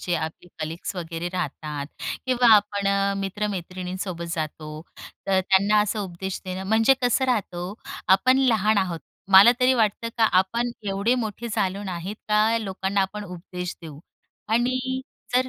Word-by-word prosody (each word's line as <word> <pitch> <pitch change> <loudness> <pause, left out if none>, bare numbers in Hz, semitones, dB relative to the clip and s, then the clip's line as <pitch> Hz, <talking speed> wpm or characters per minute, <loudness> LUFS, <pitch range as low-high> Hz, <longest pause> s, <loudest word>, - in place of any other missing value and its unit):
जे 175 - -1
आपले 160 +2 -4
कलीग्स 160 +4 -4
वगैरे 170 0 -4
राहतात 150 -5 -4 0.4
किंवा 245 -3 +6
आपण 205 -1 -1
अ, 200 0 +2
मित्र-मैत्रिणींसोबत 185 -2 -4
जातो. 155 -1 -5 0.4
तर 190 -1 +3
त्यांना 200 +3 +3
असा 210 +1 -1
उपदेश 190 0 -5
देणं 185 0 -5
म्हणजे 225 +5 +5
कसं 245 +2 +2
राहत 235 -8 0
हो, 175 +3 -5 0.3
आपण 250 +8 +5
लहान 220 -5 +3
आहोत 180 -4 -1 0.3
मला 195 +5 +10
तरी 255 +1 +5
वाटतं 225 -1 +1
का 225 - +5
आपण 235 +6 0 0.2
एवढे 200 +5 +1
मोठे 235 -1 -3
झालो 195 -2 -1
नाहीत 185 +1 -5
का 215 +2 +3
लोकांना 195 -1 -2
आपण 205 +2 -2
उपदेश 180 -1 -7
देऊ. 155 -3 -9 0.5
आणि 255 +3 0 0.3
जर 255 +1 +3
195 Hz, 145 wpm, -24 LUFS, 180-220 Hz, 0.5 s, मला